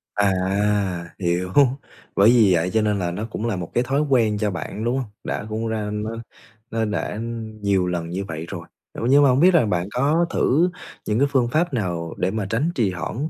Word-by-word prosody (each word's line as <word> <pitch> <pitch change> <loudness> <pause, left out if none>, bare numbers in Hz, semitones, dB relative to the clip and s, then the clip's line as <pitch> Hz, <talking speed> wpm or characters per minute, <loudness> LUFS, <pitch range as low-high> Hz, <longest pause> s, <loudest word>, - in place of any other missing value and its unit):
À! 100 -1 +3 0.9
Hiểu. 90 0 -1 0.6
Bởi 100 +3 +6
vì 115 -6 +5
vậy 85 +1 +1
cho 110 - +3
nên 105 -1 +1
là 90 -2 -1
nó 100 +5 -4
cũng 110 - -4
là 115 -4 0
một 90 -3 -6
cái 120 - +2
thói 135 +3 0
quen 120 -8 +2
cho 105 -1 0
bạn, 100 +3 -5
đúng 120 +3 0
hông? 130 -5 -4
Đã - - -3
cũng 110 +1 -2
ra 110 -2 -2
nó 105 +1 -3 0.6
nó 115 0 0
đã, 105 -1 -2
ừm, 110 -1 -6
nhiều 100 -3 +1
lần 85 -2 -3
như 95 +3 -3
vậy 80 -2 -6
rồi, - - -7 0.3
ờ, - - -7
nhưng 145 +2 +6
mà 140 - +6
hông 130 +1 +3
biết 185 +4 +6
là 165 -8 +5
bạn 90 -3 -1
có 145 +8 +2
thử 165 +7 +2 0.4
những 105 +2 0
cái 140 - +4
phương 130 -4 +2
pháp 155 +5 0
nào 85 -8 -2
để 90 +1 0
mà 110 -1 -2
tránh 140 +11 0
trì 110 -6 +1
hoãn 110 - -4
110 Hz, 225 wpm, -22 LUFS, 95-125 Hz, 0.9 s, Bởi